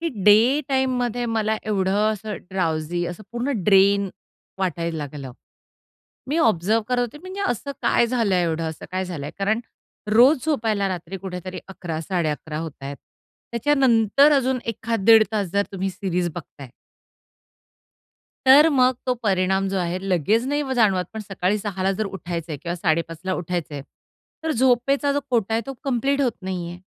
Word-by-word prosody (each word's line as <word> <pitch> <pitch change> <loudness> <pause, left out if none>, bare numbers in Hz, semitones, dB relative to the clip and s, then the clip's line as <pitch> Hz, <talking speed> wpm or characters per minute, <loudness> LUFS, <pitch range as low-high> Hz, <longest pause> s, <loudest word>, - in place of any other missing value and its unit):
की 335 - -1 0.2
डे 230 +7 +6
टाईममध्ये 250 -3 0
मला 220 -1 0
एवढं 205 +1 +1
असं 215 0 -5
ड्राउजी 175 -2 -1
असं 175 +5 -7
पूर्ण 240 +4 -1
ड्रेन 200 0 +4 0.5
वाटायला 170 -3 -2
लागलं. 145 -3 -6 1.0
मी 295 - 0
ऑब्झर्व्ह 220 - +2
करत 250 -1 +1
होते 245 +4 -3
म्हणजे 370 +4 -8
असं 260 +4 -4
काय 235 - +3
झालंय? 225 -7 +1
एवढं 165 0 -1
असं 160 - -10
काय 185 0 -1
झालंय? 160 -6 -5
कारण 215 +4 +1 0.5
रोज 250 +5 +5
झोपायला 220 -9 +1
रात्री 180 +1 -5
कुठेतरी 185 -1 -6
11-11:30 160 -4 -3
होतायेत. 145 -3 -6 0.6
त्याच्यानंतर 265 +1 +4
अजून 260 -1 +1
एखाद 230 -2 -2
दीड 225 0 +8
तास 210 -2 0
जर 200 - +3
तुम्ही 195 0 -2
सीरीज 180 -2 -2
बघताय 135 -4 -10 1.8
तर 285 +4 +8
मग 255 -3 +4
तो 255 - +2
परिणाम 195 -4 0
जो 195 - -2
आहे, 175 0 -1
लगेच 195 - +2
नाही 285 -1 -1
जाणवत 200 -6 +3
पण 220 - -5
सकाळी 195 0 -1
6 200 -3 -4
ला 190 +1 +2
जर 215 +3 -2
उठायच 175 -4 -5
आहे 155 - -4
किंवा 170 -1 -3
5:30ला 165 +2 -1
उठायच 175 -2 -3
आहे. 145 -2 -6 0.6
तर 320 - 0
झोपेचा 265 +3 +2
जो 285 - 0
कोटा 225 -3 +1
आहे, 225 - +2
तो 270 - -5
कंप्लीट 275 +1 0
होत 255 -4 +2
नाही 185 -2 -4
आहे. 175 +1 -9
200 Hz, 155 wpm, -23 LUFS, 180-245 Hz, 1.8 s, दीड